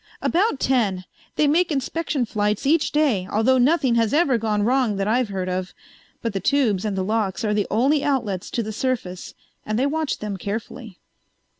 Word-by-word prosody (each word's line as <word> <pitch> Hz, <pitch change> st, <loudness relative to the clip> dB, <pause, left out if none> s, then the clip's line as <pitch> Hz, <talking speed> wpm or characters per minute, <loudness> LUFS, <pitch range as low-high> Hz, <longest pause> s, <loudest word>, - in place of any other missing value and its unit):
"About 360 Hz, -4 st, +1 dB
ten. 205 Hz, -8 st, +1 dB, 0.3 s
They 305 Hz, -, +3 dB
make 330 Hz, +4 st, +2 dB
inspection 285 Hz, -1 st, -1 dB
flights 210 Hz, 0 st, -1 dB
each 315 Hz, +3 st, +2 dB
day, 265 Hz, -12 st, +1 dB
although 245 Hz, +5 st, +3 dB
nothing 270 Hz, -1 st, +3 dB
has 225 Hz, +4 st, 0 dB
ever 280 Hz, -7 st, +3 dB
gone 210 Hz, -2 st, 0 dB
wrong 245 Hz, -2 st, +2 dB
that 195 Hz, 0 st, -1 dB
I've 235 Hz, +1 st, +1 dB
heard 190 Hz, -2 st, -3 dB
of. 185 Hz, 0 st, -3 dB, 0.5 s
But 230 Hz, -3 st, -2 dB
the 195 Hz, -, -1 dB
tubes 220 Hz, -3 st, +1 dB
and 205 Hz, -2 st, -2 dB
the 190 Hz, -, 0 dB
locks 215 Hz, +1 st, -1 dB
are 210 Hz, -, +1 dB
the 210 Hz, -1 st, 0 dB
only 275 Hz, +7 st, +2 dB
outlets 225 Hz, -10 st, -1 dB
to 235 Hz, -, -2 dB
the 215 Hz, 0 st, -5 dB
surface 215 Hz, -7 st, -3 dB, 0.3 s
and 215 Hz, 0 st, -2 dB
they 260 Hz, -, +2 dB
watch 310 Hz, +1 st, -1 dB
them 210 Hz, -2 st, -5 dB
carefully." 215 Hz, +1 st, -6 dB
230 Hz, 185 wpm, -22 LUFS, 205-275 Hz, 0.5 s, They